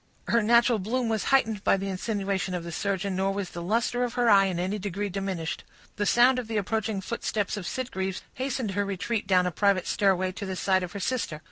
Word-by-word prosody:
Her 235 - +4
natural 235 +1 +4
bloom 230 +5 -1
was 220 -2 -1
heightened 225 -7 +2
by - - +4
the 195 - -4
insinuation 195 -1 -2
of 175 - -4
the 170 - -6
surgeon, 195 +2 -2
nor 190 +1 +1
was 195 -2 -4
the 175 - -6
luster 230 +6 0
of 245 - -3
her 240 -2 +3
eye 195 -1 +7
in 185 -3 -1
any 190 +4 -1
degree 200 +1 -3
diminished. 185 -4 -3 0.3
The 205 -1 0
sound 250 +2 +5
of 245 - -5
the 225 -1 -2
approaching 215 0 -1
footsteps 210 -1 -2
of 195 -4 -5
Sitgreaves 190 -7 -3
hastened 255 -4 -2
her 205 +1 0
retreat 200 +2 -2
down 185 -2 +4
a 180 - 0
private 195 +1 +2
stairway, 185 -3 +2
to 200 +2 -6
the 190 - -3
side 190 0 +2
of 180 -1 -5
her 200 - -5
sister. 200 -8 -2
200 Hz, 225 wpm, -27 LUFS, 190-225 Hz, 0.3 s, eye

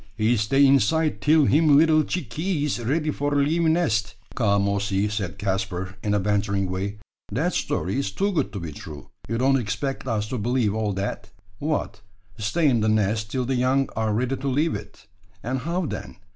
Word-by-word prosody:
He 110 +2 +3
stay 130 +6 +3
inside 140 +4 +3
till 155 0 +4
him 150 +1 +5
little 155 0 +5
chickees 150 - -2
ready 150 +6 0
for 145 0 -1
leavee 160 +4 +2
nest." 110 - +1 0.2
"Come, 100 -4 +2
Ossy!" 100 0 0
said 100 -4 -3
Caspar, 95 -1 -2
in 105 -1 0
a - - +2
bantering 100 -1 0
way; 100 +3 -3 0.3
"that - - 0
story 95 +9 -1
is 140 - -1
too 195 - -1
good 175 - 0
to 100 - -4
be 85 -3 -6
true. 75 -1 -10 0.2
You 115 - -1
don't 135 +2 +3
expect 120 +6 -3
us 110 -3 -1
to 125 - -3
believe 120 -1 +1
all 110 -2 -1
that? 100 +1 -4 0.3
What, 145 -7 -2 0.4
stay 110 +10 +1
in 125 -4 +3
the 110 0 +1
nest 110 0 +1
till 125 +2 -1
the 135 - -1
young 130 +2 +2
are 110 -1 0
ready 125 +5 0
to 135 +2 -4
leave 150 +5 +1
it! - - -8 0.4
And 130 +3 -2
how 170 +6 -2
then? - - -6
115 Hz, 185 wpm, -24 LUFS, 105-145 Hz, 0.4 s, him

